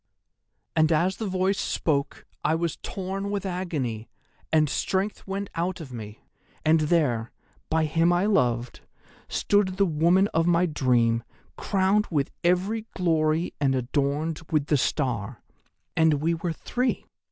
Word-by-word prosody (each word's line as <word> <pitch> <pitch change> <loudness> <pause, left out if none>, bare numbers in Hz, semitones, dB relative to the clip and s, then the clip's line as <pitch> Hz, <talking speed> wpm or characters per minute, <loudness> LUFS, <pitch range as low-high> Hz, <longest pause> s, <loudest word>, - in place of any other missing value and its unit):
"'And 160 0 +4
as 175 +4 +2
the 220 - -3
Voice 190 +1 0
spoke 140 -4 -1 0.2
I 160 - +2
was 165 -1 -2
torn 195 +1 -4
with 200 -1 -2
agony, 150 - -3 0.4
and 155 -1 +4
strength 190 +9 -2
went 195 0 -4
out 175 +2 -2
of 140 -6 -9
me, 110 -2 -8 0.4
and 160 +1 +5
there, 150 -8 +1 0.4
by 160 0 +2
him 165 +3 +2
I 175 +2 +2
loved, 125 - +1 0.5
stood 200 -2 +1
the 200 - +4
woman 170 +3 +3
of 165 +1 +1
my 175 +1 +4
dream 120 -7 +2 0.3
crowned 200 +1 +1
with 145 -5 0
every 195 +6 +1
glory 160 -2 +1
and 135 -2 +3
adorned 140 +5 -1
with 150 -3 +1
the 150 - +2
Star. 125 -5 -1 0.5
And 160 -2 +4
we 160 +4 0
were 165 +1 -2
three. 250 +10 -2
165 Hz, 140 wpm, -26 LUFS, 140-185 Hz, 0.5 s, and